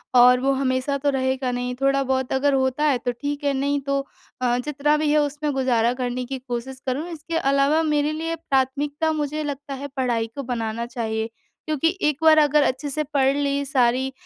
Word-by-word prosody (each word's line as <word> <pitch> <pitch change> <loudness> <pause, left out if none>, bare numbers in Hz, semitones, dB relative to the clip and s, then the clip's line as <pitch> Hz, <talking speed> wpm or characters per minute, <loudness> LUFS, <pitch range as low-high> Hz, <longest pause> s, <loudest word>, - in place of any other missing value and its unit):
और 250 0 +7
वो 270 +2 +1
हमेशा 265 +1 0
तो - - +5
रहेगा 260 -1 0
नहीं। 245 0 -2
थोड़ा-बहुत 265 -1 +1
अगर 275 +1 +2
होता 265 +2 +1
है 285 -4 +3
तो 245 +1 -2
ठीक 285 +4 -4
है 280 - +1
नहीं 280 +1 0
तो 275 0 +1 0.4
अ, 245 -1 +2
जितना 295 0 +1
भी 305 0 0
है 305 - +4
उसमें 295 +1 -2
गुज़ारा 245 -3 +2
करने 250 0 -3
की 265 +2 -4
कोशिश 250 +2 -5
करूँ। 275 +5 -2
इसके 330 +1 -4
अलावा 275 +2 +2
मेरे 300 -1 +1
लिए 325 +2 -3
प्राथमिकता 290 +1 0
मुझे 305 0 -2
लगता 285 -1 -5
है 275 +1 -5
पढ़ाई 240 -3 0
को 280 - -4
बनाना 230 -2 -3
चाहिए। 225 -2 -3 0.4
क्योंकि 325 +4 0
एक 300 -2 +2
बार 315 -1 +7
अगर 295 -1 +4
अच्छे 270 +3 -1
से 305 +2 -1
पढ़ 270 -1 +3
ली 280 0 0
सारी 260 -1 +1
275 Hz, 195 wpm, -23 LUFS, 255-295 Hz, 0.4 s, और